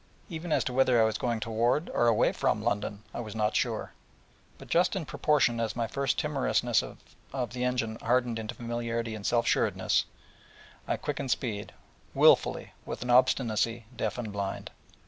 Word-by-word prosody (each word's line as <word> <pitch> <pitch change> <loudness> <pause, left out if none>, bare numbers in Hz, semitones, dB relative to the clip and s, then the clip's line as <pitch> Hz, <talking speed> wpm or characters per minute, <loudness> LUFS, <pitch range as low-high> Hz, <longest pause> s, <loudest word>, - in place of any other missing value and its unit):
Even 165 -1 -5
as - - +3
to 125 - -3
whether 130 -2 +4
I 110 - +6
was 110 - -1
going 120 -2 -1
toward, 115 +8 +1
or 120 - +2
away 115 -2 +4
from, - - 0
London, 105 0 -2
I - - -5
was 110 -2 -6
not 105 -1 0
sure. - - -1 0.6
But - - -12
just 175 +4 +2
in 185 -4 -2
proportion 140 -5 +2
as 115 -1 -1
my 120 -1 0
first 140 +4 -1
timorousness 135 -5 +1 0.5
of 125 -3 -3
the 125 0 -3
engine 125 -3 -1
hardened 120 -1 +1
into 110 +2 -5
familiarity 115 -1 -3
and 105 -2 -7
self 120 -1 +2
sureness, - - +2 0.8
I - - 0
quickened 135 - -4
speed, 110 -5 -2 0.4
wilfully, - - +4
with - - -5
an 125 - -1
obstinacy 115 -2 +2
deaf 110 -2 -2
and 110 -4 -5
blind. 100 -1 -4
120 Hz, 170 wpm, -29 LUFS, 110-125 Hz, 0.8 s, I